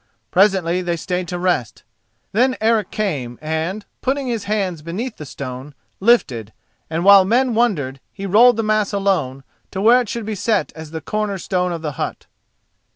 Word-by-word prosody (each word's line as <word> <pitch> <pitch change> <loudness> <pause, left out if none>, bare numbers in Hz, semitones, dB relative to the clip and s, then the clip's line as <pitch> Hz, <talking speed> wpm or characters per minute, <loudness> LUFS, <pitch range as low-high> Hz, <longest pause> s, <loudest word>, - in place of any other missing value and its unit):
Presently 185 -2 +3
they 175 -1 -1
stayed 180 +2 -3
to 180 - -4
rest. 175 - -1 0.5
Then 255 +5 +2
Eric 220 -1 +2
came 140 - -3
and 160 +7 -3 0.2
putting 275 +1 -1
his 230 -4 -3
hands 195 -6 -1
beneath 205 +10 -5
the 150 - -8
stone, 135 +1 -7 0.2
lifted, 130 - +2 0.4
and 165 +2 -2
while 200 -1 +9
men 240 +5 +2
wondered, 160 - 0
he 195 - -7
rolled 225 +5 +6
the 225 - 0
mass 215 -1 +1
alone, 180 -10 0 0.3
to 190 - -5
where 235 +5 +6
it 235 - -6
should 235 -2 -4
be 215 - -3
set 205 +1 0
as 160 -1 -9
the 160 0 -6
corner 210 +3 -2
stone 180 0 -1
of 165 -1 -5
the 150 - -2
hut. - - -4
190 Hz, 175 wpm, -20 LUFS, 160-215 Hz, 0.5 s, while